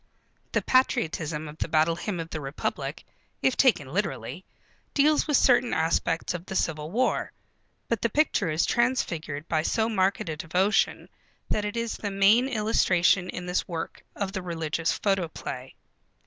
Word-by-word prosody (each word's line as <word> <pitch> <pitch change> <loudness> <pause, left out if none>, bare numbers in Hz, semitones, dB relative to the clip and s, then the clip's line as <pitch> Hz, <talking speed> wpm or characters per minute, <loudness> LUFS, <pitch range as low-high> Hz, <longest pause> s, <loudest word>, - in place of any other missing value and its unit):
The - - +1
patriotism 165 - +1
of 150 +1 -11
The - - -1
Battle 160 +1 +2
Hymn 180 +1 -4
of 165 0 -6
the 155 - -4
Republic, 135 +1 -4 0.4
if - - +3
taken - - +3
literally, - - -3 0.5
deals 300 +2 +4
with 295 -3 +4
certain 245 -1 +4
aspects 165 +1 0
of 175 -1 -5
the 190 - -5
Civil 155 -4 -1
War. 245 +8 0 0.6
But 230 -3 -1
the 235 - +1
picture 220 - +1
is 155 +1 +1
transfigured 170 - -1
by 155 -2 +1
so 220 +7 +1
marked 190 -4 +1
a 155 - -2
devotion, 180 +6 +1 0.4
that 210 - 0
it 210 +3 -3
is 230 -1 -2
the 205 - -3
main 200 +6 +4
illustration 190 -5 +2
in 180 - -5
this 180 0 -1
work 165 -2 -5
of 200 -2 -2
the 190 -1 -4
religious 165 -2 -1
photoplay. 165 -9 -2
180 Hz, 160 wpm, -27 LUFS, 160-220 Hz, 0.6 s, deals